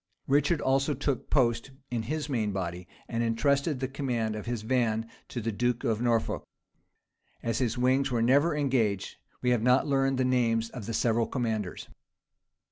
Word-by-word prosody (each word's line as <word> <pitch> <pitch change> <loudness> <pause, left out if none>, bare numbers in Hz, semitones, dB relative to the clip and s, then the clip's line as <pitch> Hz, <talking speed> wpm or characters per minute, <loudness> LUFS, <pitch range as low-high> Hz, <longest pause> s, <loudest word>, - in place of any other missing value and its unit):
Richard 145 +3 +2
also 135 +2 +2
took 140 -1 -2
post 120 -3 +2 0.2
in 120 -2 0
his 150 +7 -3
main 115 -7 0
body, 90 -2 -4 0.2
and 115 0 -2
intrusted 140 +5 +1
the 130 - -1
command 125 -5 -2
of 105 - -6
his 120 -3 -2
van 115 -2 +1 0.2
to 125 - -5
the 115 +1 -1
duke 120 +3 0
of 110 -1 0
Norfolk: 120 -2 +1 1.0
as 115 -2 -1
his 125 -1 0
wings 130 +2 +2
were 120 -2 +1
never 145 +7 +4
engaged, 125 -9 0 0.3
we 125 - +3
have 120 -3 +2
not 125 +3 +4
learned 135 -2 +1
the 130 - +2
names 115 -3 +1
of 115 -6 -7
the 115 - -2
several 115 0 +2
commanders. 110 - -3
120 Hz, 170 wpm, -29 LUFS, 115-135 Hz, 1.0 s, never